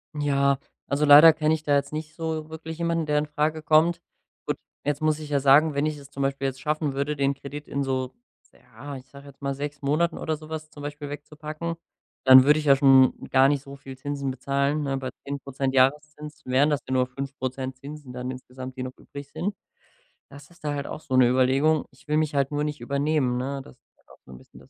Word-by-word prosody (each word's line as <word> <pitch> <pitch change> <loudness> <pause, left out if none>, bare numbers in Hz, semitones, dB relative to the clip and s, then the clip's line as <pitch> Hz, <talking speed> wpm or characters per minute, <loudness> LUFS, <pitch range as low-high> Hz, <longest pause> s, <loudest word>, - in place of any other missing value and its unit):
Ja, 140 -2 +2 0.3
also 145 +2 +1
leider 150 +3 +9
kenne 155 0 +1
ich 155 -1 -2
da 145 -2 +2
jetzt 140 0 0
nicht 155 0 -6
so 160 -1 -4
wirklich 160 0 -7
jemanden, 170 -1 0
der 150 -1 +1
infrage 150 +1 -1
kommt. 160 +2 +3 0.5
Gut, - - -1 0.3
jetzt 145 0 -1
muss 155 0 +1
ich 155 -1 -8
ja 145 -1 +2
sagen, 145 +3 +5
wenn 140 +1 0
ich 155 -1 -2
es 140 -1 -13
zum 140 0 -4
Beispiel 135 0 -1
jetzt 135 -1 -5
schaffen 150 0 -1
würde, 140 +2 -2
den 140 -1 +1
Kredit 140 +2 -9
in 140 - -2
so, 130 -1 -2 0.3
s - - -32
ja, 125 +4 -11
ich 130 0 -11
sage 140 0 -14
jetzt 140 0 -16
mal, 140 0 -1
6 145 +1 -6
Monaten 155 +4 +1
oder 155 -1 -2
so 155 0 -13
was 155 -1 -6
zum 145 - -12
Beispiel 145 0 -6
wegzupacken, 150 +3 -6 0.5
dann 130 0 +9
würde 150 +2 +5
ich 155 - -5
ja 140 -1 +7
schon 135 -1 +4
gar 135 0 +5
nicht 145 -1 0
so 140 0 -10
viel 135 -1 -11
Zinsen 140 0 -3
bezahlen, 140 +3 -1
ne? 135 -1 -1
Bei 130 -1 -4 0.2
10 140 0 -4
Prozent 135 -1 -3
Jahreszins 150 +3 0
wären 130 +4 +3
das 145 -2 +1
ja 130 - -2
nur 130 -1 +2
5 135 +2 -7
Prozent 130 0 -4
Zinsen 145 0 -10
dann 125 +1 -4
insgesamt, 130 0 -9
die 130 - -3
noch 130 0 -7
übrig 140 0 -10
sind. 200 +2 -3 0.7
Das 140 +1 -14
ist 175 -1 -22
da 150 -1 -1
halt 140 -1 -4
auch - - -7
so 130 - -3
'ne 130 -1 +6
Überlegung. 135 +4 +2
Ich 130 +3 -23
will 150 0 +1
mich 155 -2 0
halt 140 0 +1
nur 145 0 -1
nicht 150 0 -4
übernehmen, 140 -3 0
ne? 135 +2 -3
Das 135 - -15
ist - - -52
halt - - -35
auch - - -18
so - - -14
'n 65 - -10
bisschen - - -17
das - - -19
140 Hz, 240 wpm, -25 LUFS, 135-150 Hz, 0.7 s, leider